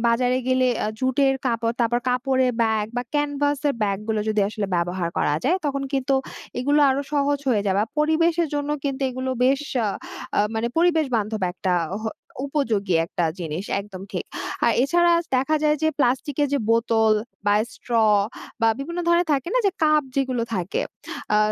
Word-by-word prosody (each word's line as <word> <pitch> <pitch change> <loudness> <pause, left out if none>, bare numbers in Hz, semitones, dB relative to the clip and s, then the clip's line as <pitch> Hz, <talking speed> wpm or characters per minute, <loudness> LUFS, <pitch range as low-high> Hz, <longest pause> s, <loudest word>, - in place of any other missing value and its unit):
বাজারে 250 +2 +2
গেলে 255 0 +3 0.2
আ - - 0
জুটের 270 +1 +2
কাপড়, 230 -1 0
তারপর 240 +1 +2
কাপড়ের 255 +1 +2
ব্যাগ 220 -2 +1
বা 245 - 0
ক্যানভাস 290 -1 +1
এর 280 - 0
ব্যাগ 200 -2 0
গুলো 220 -1 +1
যদি 215 -1 +1
আসলে 210 -1 -3
ব্যবহার 175 0 -1
করা 145 - +1
যায় 345 +7 +3
তখন 275 -1 -1
কিন্তু 270 0 +1 0.4
এগুলো 290 +4 +2
আরো 275 +2 0
সহজ 285 0 +1
হয়ে 210 -4 +2
যাবা। 190 - +2 0.2
পরিবেশের 325 +2 +2
জন্য 290 0 -1
কিন্তু 275 -1 -2
এগুলো 260 +1 -3
বেশ 270 +2 +3 0.2
আ - - +1 0.5
আ - - +6
মানে 225 +1 0
পরিবেশ 330 -2 +3
বান্ধব 215 -1 -2
একটা 185 0 -2 0.3
হ - - -7 0.4
উপযোগী 220 - 0
একটা 175 - -2
জিনিস 170 +2 -4 0.2
একদম 195 -2 -9
ঠিক। - - -3 0.4
আর - - +4
এছাড়া 345 +4 +3 0.2
দেখা 270 +5 +2
যায় 300 0 +3
যে 315 - +4
প্লাস্টিক 265 +1 +1
এর 290 - +2
যে - - +2
বোতল 225 -1 +3 0.3
বা 205 - +4 0.2
স্ট্র 245 - -10 0.7
বা 225 - +4
বিভিন্ন 335 +6 -5
ধরনের 345 +1 +3
থাকে 275 +2 0
না - - +4
যে - - +4
কাপ 305 -1 +4
যেগুলো 260 -3 0
থাকে। 180 0 -1 0.5
আ - - +5
255 Hz, 175 wpm, -23 LUFS, 220-290 Hz, 0.7 s, আ